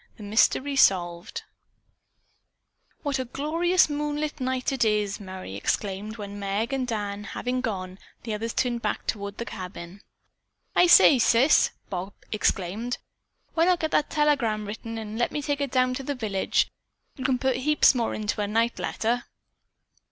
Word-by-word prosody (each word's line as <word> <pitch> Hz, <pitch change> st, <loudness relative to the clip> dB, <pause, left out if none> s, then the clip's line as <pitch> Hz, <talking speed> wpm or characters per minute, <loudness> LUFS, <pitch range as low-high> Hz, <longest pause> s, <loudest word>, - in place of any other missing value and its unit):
THE 215 Hz, -, -10 dB
MYSTERY 255 Hz, +6 st, +2 dB
SOLVED 175 Hz, -6 st, +2 dB, 1.6 s
"What 285 Hz, -3 st, -1 dB
a 260 Hz, -, -2 dB
glorious 330 Hz, +8 st, +2 dB
moonlit 295 Hz, 0 st, -2 dB
night 255 Hz, +1 st, -1 dB
it 265 Hz, -3 st, +1 dB
is!" 210 Hz, -2 st, +1 dB
Merry 185 Hz, -, -8 dB
exclaimed 205 Hz, -, -2 dB
when, 205 Hz, -1 st, -7 dB
Meg 205 Hz, +6 st, -2 dB
and 260 Hz, -2 st, -1 dB
Dan 205 Hz, -3 st, -3 dB
having 250 Hz, +5 st, -3 dB
gone, 190 Hz, -5 st, -4 dB, 0.2 s
the 225 Hz, -, -3 dB
others 225 Hz, +2 st, -3 dB
turned 240 Hz, -1 st, -1 dB
back -, -, -2 dB
toward 200 Hz, -1 st, -3 dB
the 235 Hz, -, -4 dB
cabin. 185 Hz, -1 st, -8 dB, 0.7 s
"I 355 Hz, -, +6 dB
say, 295 Hz, -5 st, +8 dB
sis," 235 Hz, +6 st, +5 dB, 0.2 s
Bob 190 Hz, +1 st, -4 dB, 0.2 s
exclaimed, 215 Hz, +3 st, -1 dB, 0.6 s
"why 330 Hz, 0 st, +3 dB
not 360 Hz, -1 st, +3 dB
get 315 Hz, -, -1 dB
that 300 Hz, -, +2 dB
telegram 275 Hz, -9 st, +1 dB
written 225 Hz, +2 st, -6 dB
and 220 Hz, 0 st, -6 dB
let 240 Hz, -, +1 dB
me -, -, -2 dB
take 285 Hz, 0 st, -2 dB
it 280 Hz, -, 0 dB
down 255 Hz, 0 st, +2 dB
to 255 Hz, -, -4 dB
the 285 Hz, +1 st, -3 dB
village. 210 Hz, -6 st, 0 dB, 0.5 s
You 260 Hz, -, -7 dB
can 260 Hz, -1 st, +2 dB
put 260 Hz, 0 st, 0 dB
heaps 300 Hz, +3 st, +4 dB
more 240 Hz, -3 st, -1 dB
into 210 Hz, 0 st, -2 dB
a 205 Hz, -, 0 dB
night 230 Hz, +3 st, 0 dB
letter." 240 Hz, +2 st, -1 dB
230 Hz, 160 wpm, -26 LUFS, 205-270 Hz, 1.6 s, say